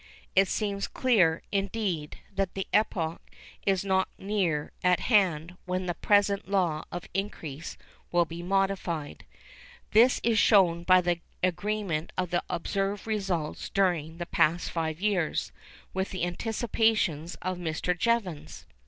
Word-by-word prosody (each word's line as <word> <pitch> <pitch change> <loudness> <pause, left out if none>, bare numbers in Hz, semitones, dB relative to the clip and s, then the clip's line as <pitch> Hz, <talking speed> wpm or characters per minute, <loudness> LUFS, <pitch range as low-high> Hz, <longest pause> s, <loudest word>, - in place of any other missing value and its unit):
It 195 0 +5
seems 200 -1 -1
clear, 190 -11 +2
indeed, 195 -6 -2 0.2
that 195 -1 -1
the 195 - -2
epoch 170 -6 +1 0.5
is 195 0 +2
not 190 -1 +2
near 185 -7 -1
at 180 -1 +3
hand 180 -6 +2
when 185 0 -2
the 175 - -1
present 200 +1 +2
law 175 -6 +1
of 175 -1 -6
increase 165 -6 -4 0.3
will 175 -1 +3
be 165 +1 -7
modified. 185 -5 -1 0.7
This 235 +4 +5
is 225 -2 +3
shown 180 -6 +5
by 185 0 +6
the 175 -1 0 0.2
agreement 185 -3 -1
of 180 -2 -1
the 175 - +2
observed 195 +3 -2
results 190 -8 -2
during 170 -5 0
the 175 - -4
past 170 +1 +1
five 160 -1 -2
years 190 -5 0 0.4
with 190 +1 -1
the 185 - -4
anticipations 210 -4 0
of 185 0 -2
Mr. 175 +1 -1
Jevons. 180 -8 -1
185 Hz, 135 wpm, -28 LUFS, 170-200 Hz, 0.7 s, by